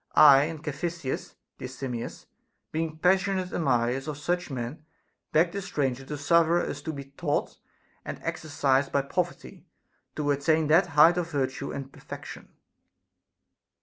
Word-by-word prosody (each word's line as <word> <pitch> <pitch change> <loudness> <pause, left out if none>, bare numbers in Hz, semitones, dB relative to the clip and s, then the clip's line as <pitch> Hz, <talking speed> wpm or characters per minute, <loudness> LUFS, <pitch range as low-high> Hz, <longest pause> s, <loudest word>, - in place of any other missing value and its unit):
1 145 0 +8
and 160 -2 -8
Caphisias, 155 -1 -4 0.2
dear - - -5
Simmias, 125 -2 -6 0.5
being 160 0 -2
passionate 190 +2 +2
admirers 130 -2 +1
of 150 -2 -4
such 175 +4 -1
men, 130 +3 -5 0.5
beg 165 +2 +3
the 200 +2 -4
stranger 135 -8 -2
to 150 +2 -6
suffer 170 +3 +4
us - - -3
to 160 - -4
be 140 -2 -7
taught 140 - -2 0.4
and - - -6
exercised 140 -3 0
by 140 - +2
poverty 175 +5 -3 0.5
to 145 -1 0
attain 155 +3 +2
that 160 +5 +4
height 170 +4 +7
of 170 -1 -3
virtue 135 -1 -2
and 135 -1 -6
perfection. - - -9
150 Hz, 140 wpm, -27 LUFS, 135-170 Hz, 0.5 s, 1